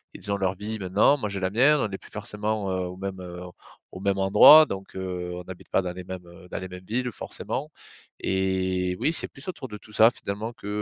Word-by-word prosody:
ils 100 - -6
ont - - +2
leur 95 -1 0
vie, 110 +2 -5
maintenant, 100 +10 +3
moi, 105 -6 -3
j'ai 100 - -4
la 95 - +1
mienne. 135 +8 +5
On 110 - 0
est 95 - -4
plus - - -17
forcément, 105 0 -3
heu, 95 -1 -1
au 90 +1 -8
même, 95 -1 -5
heu, 90 0 -8 0.5
au 95 - -9
même 100 0 +1
endroit 105 +11 +9
donc 95 -7 -7
heu, 90 -2 -4
on 90 - -6
habite 90 - -10
pas 95 - +2
dans 90 -1 -3
les 90 0 -8
mêmes, 95 -1 -7
heu, 85 +1 -14
dans - - -4
les 95 - -6
mêmes 90 0 -9
villes 125 +3 -1
forcément - - -5 0.5
et 95 -1 0
oui, 160 - +1
c'est - - +1
plus 135 - -16
autour 155 -7 -5
de 105 - -7
tout 105 +1 -17
ça, 110 +1 +7
finalement, 110 +2 -5
que, 105 - -11
95 Hz, 245 wpm, -26 LUFS, 95-110 Hz, 0.5 s, endroit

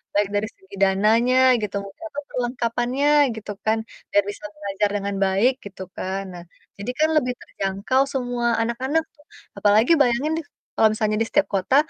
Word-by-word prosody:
Baik 205 0 +3
dari 205 +1 0
segi 190 +1 -14
dananya 220 +6 +3 0.2
gitu, 205 -1 -4
mungkin 200 +12 -13
atau 290 - -4
perlengkapannya 245 +2 -1 0.3
gitu 215 -1 -7
kan, 220 +1 +3 0.3
biar 205 - +4
bisa 205 - -14
belajar 200 0 -1
dengan 200 0 -2
baik 195 +7 +3
gitu 190 -1 -8
kan. 190 +1 -3
Nah, 175 - -9 0.4
jadi 205 +5 -3
kan 310 +1 +4
lebih 250 -4 +1
terjangkau 200 +7 -1
semua 245 -2 -1
anak-anak 260 +7 0
tuh, 295 -1 -24 0.3
apalagi 215 +6 +4
bayangin 260 +4 +2
deh 325 - -8 0.3
kalau 220 - +5
misalnya 215 -1 0
di 225 - +1
setiap 295 - +2
kota 195 +7 +1
220 Hz, 165 wpm, -23 LUFS, 200-250 Hz, 0.4 s, kalau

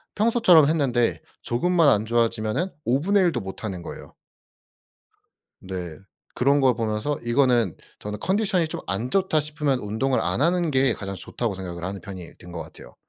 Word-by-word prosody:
평소처럼 210 -9 +5
했는데 130 -7 +1 0.2
조금만 165 +6 +3
안 105 -4 +3
좋아지면은 115 - 0
5 130 +4 +2
분의 200 +4 +3
1 175 - +3
도 - - -2
못하는 95 -1 -6
거예요. - - -10 1.4
네. 90 -4 -6 0.4
그런 140 +3 +3
걸 130 -3 +4
보면서 110 +5 -2
이거는 120 - +2 0.2
저는 105 0 -6
컨디션이 190 -4 +1
좀 - - -5
안 105 +7 -2
좋다 190 -3 +2
싶으면 150 -2 -1
운동을 120 +5 0
'안 - - -1
하는 170 +2 +2
게 135 -2 +3
가장 100 0 -6
좋다.'고 105 +4 -4
생각을 90 -2 -6
하는 95 +1 -5
편이 90 -2 -10
된 90 - -13
거 85 - -5
같아요. - - -14
125 Hz, 330 characters per minute, -24 LUFS, 100-155 Hz, 1.4 s, 평소처럼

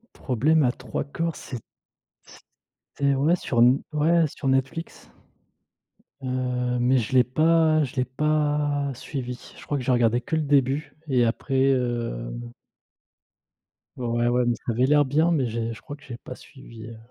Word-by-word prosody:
Problème 145 +5 +2
à 125 - +3
Trois 125 -1 -5
Corps, 165 +3 -3
c'est 125 - -7 1.4
c'était 140 -1 +2
ouais, 150 +6 +2
sur 120 -8 +1 0.3
ouais, 160 +2 +3
sur 140 -2 -5
Netflix, 135 +5 -2 1.1
heu, 125 -1 -1
mais 125 +2 +3
je 120 +2 -2
l'ai 125 - +6
pas 155 +4 +3
je 130 - -5
l'ai 130 -1 +1
pas 145 0 0
suivi. 125 -1 -7
Je - - -12
crois 145 - -1
que 130 - -4
j'ai 130 - +1
regardé 120 0 +2
que 160 +6 -3
le 160 - +1
début 140 0 +1
et 125 -4 +3
après, 135 +3 +1
heu 120 - -2 1.7
Ouais, 125 - -3
ouais, 120 0 +1
ouais 125 0 +2
mais 120 -1 +1
ça 120 - -4
avait 125 +3 +2
l'air 145 +1 +5
bien 155 +6 +2
mais 140 -7 +1
j'ai 115 0 -3
je 115 - -12
crois 145 - -8
que 145 - -21
j'ai 125 -4 -8
pas 125 - -9
suivi, 115 -5 -13
heu 115 -1 -10
130 Hz, 170 wpm, -25 LUFS, 120-145 Hz, 1.7 s, l'ai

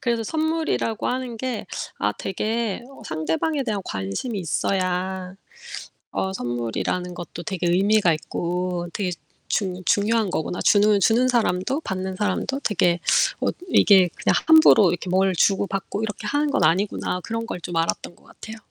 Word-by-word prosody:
그래서 235 -2 0
'선물이라고 315 -5 -1
하는 250 -2 -3
게 245 -1 -4 0.3
아 - - 0
되게 220 +3 -2
어 275 - -14
상대방에 160 - -1
대한 215 -5 -2
관심이 95 - -4
있어야 185 +2 -2 0.8
어 190 0 -2
선물이라는 120 +7 -3
것도 175 0 -8
되게 185 -4 -2
의미가 195 0 +3
있고 175 +2 -3
되게 190 -3 -2 0.4
중 185 -3 -2
중요한 210 -1 +2
거구나. 170 +2 -2
주는, 210 -1 +4
주는 230 +6 +3
사람도 240 - 0
받는 190 -6 -4
사람도 210 +8 -1
되게 175 -4 +2 0.4
어 - - +1 0.2
이게 190 - +6
그냥 - - +1
함부로 315 - +7
이렇게 175 +2 -3
뭘 190 +1 +2
주고받고 195 +2 0
이렇게 210 -2 -5
하는 290 +1 +1
건 - - +1
아니구나.' 185 0 +1
그런 230 0 -3
걸 180 - -6
좀 175 0 -6
알았던 165 +1 -1
것 - - -25
같아요. 220 0 -10
195 Hz, 325 characters per minute, -23 LUFS, 180-230 Hz, 0.8 s, 함부로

